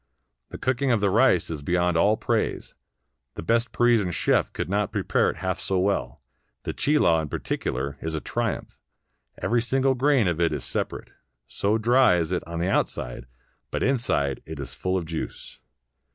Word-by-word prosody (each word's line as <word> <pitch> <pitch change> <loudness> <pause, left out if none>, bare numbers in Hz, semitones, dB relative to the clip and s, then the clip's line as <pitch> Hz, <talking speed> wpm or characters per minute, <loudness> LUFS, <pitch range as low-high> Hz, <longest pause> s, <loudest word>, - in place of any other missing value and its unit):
The - - -7
cooking 130 +1 0
of 115 - +3
the 100 -1 +1
rice 110 -6 +3
is 75 -3 -4
beyond 90 +3 +1
all 105 +6 +3
praise; - - -1 0.6
the - - -6
best 115 +4 +1
Parisian 120 -6 +3
chef 85 - +1
could - - -4
not 100 +1 0
prepare - - +1
it - - -4
half 95 0 -3
so 95 - -1
well; 100 +2 -1 0.4
the - - -3
chilaw, 140 - +3
in 75 - -5
particular, 70 +2 -3
is 80 0 -3
a - - -1
triumph: - - -3 0.6
every 120 0 +1
single 135 +2 +2
grain 130 -4 +3
of 85 -1 0
it 85 - +3
is 75 - -4
separate, - - -4 0.3
so 100 - 0
dry 120 -2 +4
is 85 0 -1
it 90 - -1
on 85 0 -4
the 85 - 0
outside; - - -2 0.4
but - - -2
inside 70 - 0
it 80 -2 -7
is 70 - -6
full 95 0 -1
of 90 - -3
juice. 80 0 -6
95 Hz, 180 wpm, -25 LUFS, 80-120 Hz, 0.6 s, dry